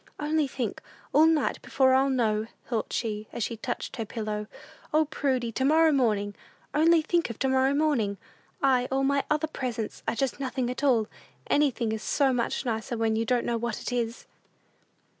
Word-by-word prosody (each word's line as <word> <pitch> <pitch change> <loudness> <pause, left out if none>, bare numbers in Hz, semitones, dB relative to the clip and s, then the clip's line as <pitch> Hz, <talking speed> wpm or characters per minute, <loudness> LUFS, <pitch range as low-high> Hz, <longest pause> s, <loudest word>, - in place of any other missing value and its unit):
"Only 300 0 +1
think; 250 -4 -4 0.3
all 315 +2 +6
night 320 -4 +1
before 260 -1 +3
I'll 265 +1 +4
know," 220 -4 +1 0.2
thought 230 -4 -2
she, 215 -2 -2
as 235 - -3
she 230 - -2
touched 240 +2 -5
her 225 - -1
pillow. 210 -1 -4 0.4
"O, 310 +1 +3
Prudy, 260 -5 -1
to 260 - -2
morrow 315 +3 +5
morning! 210 -7 +1 0.4
Only 320 +2 +4
think 340 -1 +1
of 230 - -6
to 265 - 0
morrow 265 +1 +3
morning 265 -10 +1 0.5
I 255 -2 +3
All 270 +1 0
my 280 +1 +2
other 305 +1 +1
presents 245 -7 -4
are - - 0
just 270 +2 -1
nothing 260 -2 -2
at 250 - -6
all. 235 -6 +3 0.4
Anything 260 -6 +1
is 220 -1 -3
so 275 -3 +2
much 245 +2 -1
nicer 230 +1 -2
when 225 -1 +1
you 225 +1 0
don't 245 0 +1
know 235 - 0
what 235 -1 -3
it - - -5
is!" 235 -1 -2
255 Hz, 185 wpm, -27 LUFS, 225-280 Hz, 0.5 s, all